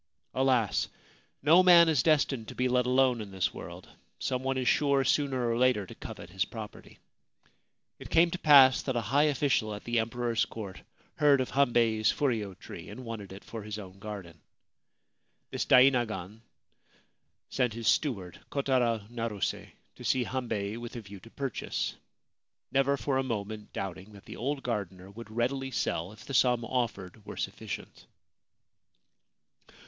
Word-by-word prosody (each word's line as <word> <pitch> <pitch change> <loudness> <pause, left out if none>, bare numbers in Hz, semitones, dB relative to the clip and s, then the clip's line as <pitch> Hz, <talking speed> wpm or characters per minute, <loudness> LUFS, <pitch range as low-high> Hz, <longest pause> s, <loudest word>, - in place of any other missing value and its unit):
Alas! 130 -5 +2 0.6
no 165 +5 +7
man 175 -2 +8
is 155 -6 +3
destined 140 -6 +2
to - - -8
be 125 - +1
let 125 0 +2
alone 125 -2 +3
in 105 - -7
this 95 -2 -1
world. - - -9 0.3
Some 130 -1 -2
one 135 0 -1
is 130 -1 -1
sure, 140 -2 +3
sooner 130 -2 +1
or 115 - +1
later, 125 -5 +3
to - - -11
covet 85 - -9
his 95 0 0
property. 110 +1 -9 1.0
It - - -9
came 170 +1 +4
to 180 - -4
pass 135 -4 +7
that 130 - -3
a 120 - +1
high 145 +2 +5
official 135 -7 +1
at 105 - -9
the 120 0 0
Emperor's 115 0 0
court 100 -5 -8 0.4
heard 145 -2 +5
of 130 - -2
Hambei's 115 -5 +3
furyo 110 -9 -1
tree - - -10
and 130 - -9
wanted 110 -4 -7
it 95 +1 -10
for 115 - -7
his 105 0 -6
own 95 -2 -10
garden. 100 -6 -8 1.1
This - - -2
dainagon 115 -6 +3 1.1
sent 125 -4 0
his 115 -2 -4
steward, 100 - 0
Kotaro 125 -6 0
Naruse, 115 -4 -3 0.3
to - - -10
see 130 - +2
Hambei 115 -5 -3
with 120 +1 -8
a 120 - -5
view 100 -1 -11
to 115 - -15
purchase, 135 -1 -3 0.8
never 135 +1 +2
for 135 -1 -1
a - - +1
moment 110 -3 -5
doubting 95 +2 -6
that 100 - -14
the - - -9
old 135 +4 -2
gardener 95 -5 -4
would 115 +2 -10
readily 130 +4 -1
sell 90 -7 -2
if 105 0 -14
the 140 - -7
sum 125 -2 +3
offered 110 -6 -3
were - - -9
sufficient. - - -6
120 Hz, 160 wpm, -29 LUFS, 105-135 Hz, 1.1 s, man